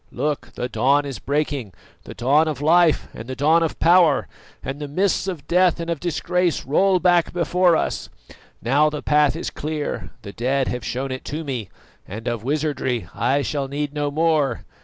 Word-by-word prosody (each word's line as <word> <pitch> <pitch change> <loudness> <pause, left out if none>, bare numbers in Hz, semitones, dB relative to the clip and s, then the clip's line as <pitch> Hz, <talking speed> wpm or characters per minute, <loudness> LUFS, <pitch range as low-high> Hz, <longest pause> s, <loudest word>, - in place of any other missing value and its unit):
Look, 150 -1 -3
the 125 - -3
dawn 140 +3 +2
is 135 -3 -6
breaking 140 - -2 0.3
the - - -9
dawn 145 +6 +3
of 150 -4 -3
life 165 +2 +3
and 115 - -9
the 130 - -5
dawn 155 +5 +3
of 165 - -1
power 170 -4 +4 0.4
and 135 +2 -5
the 145 - -5
mists 185 +6 0
of 175 -7 -5
death 180 0 +3
and 170 0 -3
of 165 - -2
disgrace 175 0 -1
roll 185 +7 +3
back 175 -1 +3
before 175 0 +3
us. - - -2 0.5
Now 145 +6 +3
the 150 -1 -6
path 150 -1 +3
is 165 - -4
clear, 150 -1 -4
the 100 - -8
dead 130 +3 0
have 125 -2 -4
shown 130 +5 -3
it 130 - -5
to 155 +3 -4
me, 125 - -4 0.4
and 110 +4 -7
of 120 -3 -2
wizardry 135 - -1
I 130 +7 +1
shall 140 -2 -2
need 145 +1 -3
no 145 -1 -1
more." 150 -4 +1
145 Hz, 185 wpm, -22 LUFS, 130-165 Hz, 0.5 s, power